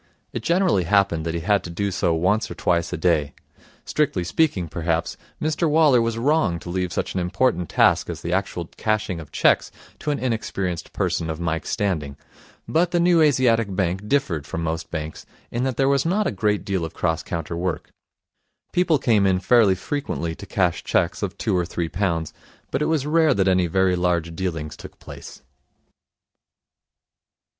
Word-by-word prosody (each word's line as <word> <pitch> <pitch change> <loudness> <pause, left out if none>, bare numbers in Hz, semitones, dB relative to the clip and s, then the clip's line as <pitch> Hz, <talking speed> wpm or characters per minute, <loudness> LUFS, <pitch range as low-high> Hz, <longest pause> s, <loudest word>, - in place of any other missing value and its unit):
It - - -3
generally 170 - +2
happened 95 -4 +2
that 80 - -2
he 85 - -2
had 100 +3 +2
to - - -7
do 100 +4 -2
so 85 -2 +1
once 95 +7 +1
or 85 - -7
twice 85 0 0
a 90 - -2
day. 80 -4 +1 0.5
Strictly 145 -12 0
speaking, 95 - +1
perhaps, 80 +1 -2 0.2
Mr 155 +1 0
Waller 150 -5 +5
was 115 0 -1
wrong 125 - +2
to 85 - -7
leave 90 -1 -1
such - - -2
an 95 - -1
important 90 - 0
task - - +3
as - - -5
the 85 - -2
actual 95 -2 -1
cashing 105 -5 -1
of 75 -3 -10
cheques - - +3 0.3
to - - -4
an 145 - +1
inexperienced 100 -8 -3
person 80 - -1
of 80 0 -4
Mike's 80 -1 -2
standing; 80 -10 -2 0.5
but 170 +2 +2
the 175 - +1
New 170 -1 +4
Asiatic 115 -8 +3
Bank 95 +2 -1
differed 95 - 0
from 85 - -4
most 80 0 -3
banks 80 -1 -5 0.3
in 120 +2 -1
that 130 -2 -2
there 135 - +3
was 140 -1 +3
not 195 +6 +1
a - - 0
great 105 +1 0
deal 95 -3 -1
of 80 - -6
cross 80 -2 0
counter 85 0 -4
work. 90 0 -3 0.8
People 175 -3 +3
came 110 -7 +3
in 95 -1 +3
fairly 105 0 +4
frequently 95 - -3
to 100 - -11
cash 90 -4 0
cheques - - 0
of - - -3
two - - 0
or 90 - +2
three 85 -1 -3
pounds, 85 -5 -1 0.4
but 135 - -1
it - - +2
was 155 -4 0
rare 155 -2 +3
that 95 -1 +2
any 90 -2 +3
very 95 +2 +2
large 85 -2 0
dealings 80 -4 -3
took - - -12
place. - - -11
95 Hz, 185 wpm, -23 LUFS, 85-125 Hz, 0.8 s, Waller